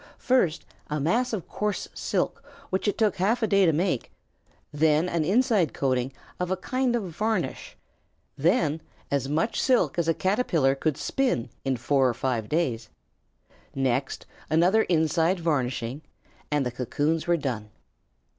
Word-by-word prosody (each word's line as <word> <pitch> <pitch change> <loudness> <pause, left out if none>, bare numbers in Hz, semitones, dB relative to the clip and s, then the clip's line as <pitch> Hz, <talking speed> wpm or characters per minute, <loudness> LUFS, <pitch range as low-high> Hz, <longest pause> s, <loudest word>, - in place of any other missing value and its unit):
First 245 - +1 0.2
a 150 - -1
mass 230 - +1
of 210 -7 -4
coarse 210 -1 -2
silk - - -2 0.3
which 190 +3 -1
it 205 - 0
took 215 -3 +2
half 220 +6 +1
a - - +3
day 195 -2 +4
to - - +5
make, 165 -4 -1 0.6
then 155 +2 +3
an 170 -3 0
inside 205 - +2
coating 130 -1 0 0.3
of 180 0 -1
a 185 - 0
kind 255 +5 0
of 235 - -1
varnish, 215 +2 -2 0.6
then 160 0 +1 0.3
as 140 -1 0
much 160 +9 0
silk 250 -8 +2
as 165 - 0
a 165 - +2
Caterpillar 180 - +2
could 145 +1 -1
spin 245 - -1
in 135 -2 0
four 135 +2 +2
or 120 - -2
five 120 -3 -2
days, 130 -9 -1 0.9
next 130 0 -1 0.2
another 175 +8 +4
inside 165 +2 +2
varnishing, 130 -4 -1 0.5
and 150 -2 +1
the 125 - -1
cocoons 150 +6 -1
were 175 0 +3
done. 120 -8 -4
160 Hz, 150 wpm, -26 LUFS, 135-195 Hz, 0.9 s, to